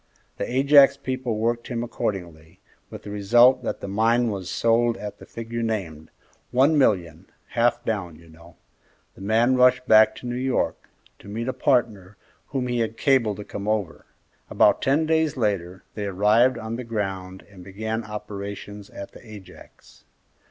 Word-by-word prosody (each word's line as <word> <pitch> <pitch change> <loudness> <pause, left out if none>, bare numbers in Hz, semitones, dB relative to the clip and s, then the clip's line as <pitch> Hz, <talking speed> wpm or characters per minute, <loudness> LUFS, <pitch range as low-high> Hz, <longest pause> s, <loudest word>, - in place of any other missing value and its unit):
The - - -4
Ajax 140 +1 +6
people 130 -4 -3
worked 115 +2 -1
him 120 -2 -3
accordingly, 90 -7 -5 0.3
with - - -10
the 105 - -8
result 120 +6 +4
that - - -4
the - - -5
mine 115 +4 +2
was 95 -3 -5
sold 115 0 +1
at 105 -1 -8
the - - -13
figure 115 0 -6
named, 95 -9 -4 0.4
one 135 +6 +3
million, 90 - +1 0.2
half 120 0 +1
down, 100 -7 -3
you 85 +1 -18
know. 85 +1 -17 0.6
The - - -16
man 115 +5 +2
rushed 125 0 +4
back 110 -1 +6
to 125 - -11
New 120 - -3
York, 130 0 -2 0.3
to - - -15
meet 115 +4 -5
a 130 - -1
partner 105 -8 0 0.3
whom 135 -3 -3
he 120 -1 -1
had 115 0 -2
cabled 120 -8 +2
to 105 - -7
come 100 +1 -7
over. 95 -9 -2 0.4
About 105 - +3
ten 145 +4 +2
days 160 -2 +1
later 95 -5 -2
they 105 -1 -4
arrived 105 +6 +3
on 110 +1 -5
the 125 - -5
ground 95 -5 -5
and 95 -3 -14
began 110 +4 -4
operations 100 -1 -8
at 100 - -9
the - - -15
Ajax. 105 -5 -15
110 Hz, 165 wpm, -24 LUFS, 100-120 Hz, 0.6 s, Ajax